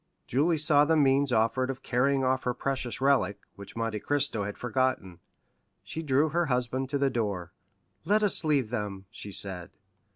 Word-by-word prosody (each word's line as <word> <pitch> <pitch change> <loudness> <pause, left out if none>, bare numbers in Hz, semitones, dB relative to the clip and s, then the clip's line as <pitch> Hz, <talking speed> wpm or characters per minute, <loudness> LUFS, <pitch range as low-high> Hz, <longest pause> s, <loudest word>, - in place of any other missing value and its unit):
Julie 155 +6 +1
saw 150 -1 +5
the 160 +2 +2
means 140 -1 +3
offered 115 +3 +1
of 135 0 -5
carrying 135 +2 +1
off 130 0 +1
her 125 -1 -2
precious 130 -2 -3
relic, 130 -8 +2 0.2
which 100 -1 -11
Monte 115 -2 -2
Cristo 140 -6 -1
had 105 - -6
forgotten. 125 -8 -1 0.6
She 160 - -6
drew 150 0 +2
her 170 +2 0
husband 130 0 -1
to 140 - 0
the 140 -1 +1
door. 100 -8 -3 0.5
"Let 215 +1 +2
us 200 -3 +2
leave 140 -7 +1
them," 100 -4 -4
she 105 -3 -8
said. 95 -3 -2
130 Hz, 170 wpm, -28 LUFS, 110-140 Hz, 0.6 s, saw